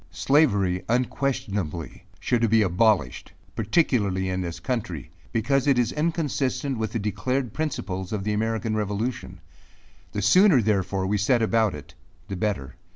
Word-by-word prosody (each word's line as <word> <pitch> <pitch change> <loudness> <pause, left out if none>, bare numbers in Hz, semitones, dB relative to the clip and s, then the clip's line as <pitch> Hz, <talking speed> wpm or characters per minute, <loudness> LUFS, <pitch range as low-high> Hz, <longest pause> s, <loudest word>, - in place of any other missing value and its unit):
Slavery, 100 - +2
unquestionably, 105 - -2
should 115 -2 +1
be 110 0 +4
abolished, 100 +2 +1 0.2
particularly 105 - +1
in 95 0 -2
this 85 -2 -5
country; 90 - -4 0.2
because 135 +5 +1
it 140 -3 +4
is 120 -2 +2
inconsistent 145 -5 -1
with 110 -1 -2
the - - 0
declared 115 +4 -2
principles 95 - -3
of 105 -3 -2
the 105 +1 -1
American 110 0 -1
Revolution. 105 +3 -3 0.7
The 105 - -2
sooner, 180 - +6
therefore, 95 -3 0
we 100 +2 0
set 115 +3 +2
about 110 -4 +2
it, 75 - -11 0.4
the 100 - -3
better. 90 -9 -3
110 Hz, 140 wpm, -25 LUFS, 95-125 Hz, 0.7 s, sooner